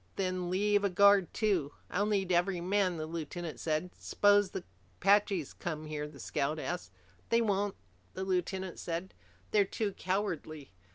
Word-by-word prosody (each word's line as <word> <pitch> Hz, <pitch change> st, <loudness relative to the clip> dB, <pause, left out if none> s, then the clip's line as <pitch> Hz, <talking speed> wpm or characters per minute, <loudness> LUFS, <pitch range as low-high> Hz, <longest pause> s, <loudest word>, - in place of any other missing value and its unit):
"Then 185 Hz, -2 st, -1 dB
leave 205 Hz, +2 st, +2 dB
a 200 Hz, -, +3 dB
guard 200 Hz, -1 st, +5 dB
too." 185 Hz, -10 st, 0 dB, 0.2 s
"I'll 205 Hz, +3 st, +1 dB
need 195 Hz, -3 st, +1 dB
every 175 Hz, +1 st, +2 dB
man," 185 Hz, 0 st, +1 dB
the 155 Hz, -, -3 dB
lieutenant 165 Hz, 0 st, -5 dB
said. 160 Hz, +3 st, -1 dB
"S'pose 205 Hz, -1 st, +4 dB
the -, -, -5 dB, 0.4 s
Apaches 195 Hz, -5 st, +3 dB
come 155 Hz, -3 st, -5 dB
here?" 150 Hz, -1 st, -4 dB
the 150 Hz, -2 st, -13 dB
scout 145 Hz, +3 st, -1 dB
asked. 175 Hz, -, -4 dB, 0.4 s
"They 230 Hz, -, +4 dB
won't," 205 Hz, -3 st, +1 dB, 0.4 s
the 190 Hz, -, -3 dB
lieutenant 185 Hz, 0 st, -2 dB
said. 170 Hz, +2 st, -4 dB, 0.4 s
"They're 210 Hz, -1 st, +5 dB
too 200 Hz, +1 st, -2 dB
cowardly. 170 Hz, -7 st, -3 dB
185 Hz, 155 wpm, -32 LUFS, 165-200 Hz, 0.4 s, guard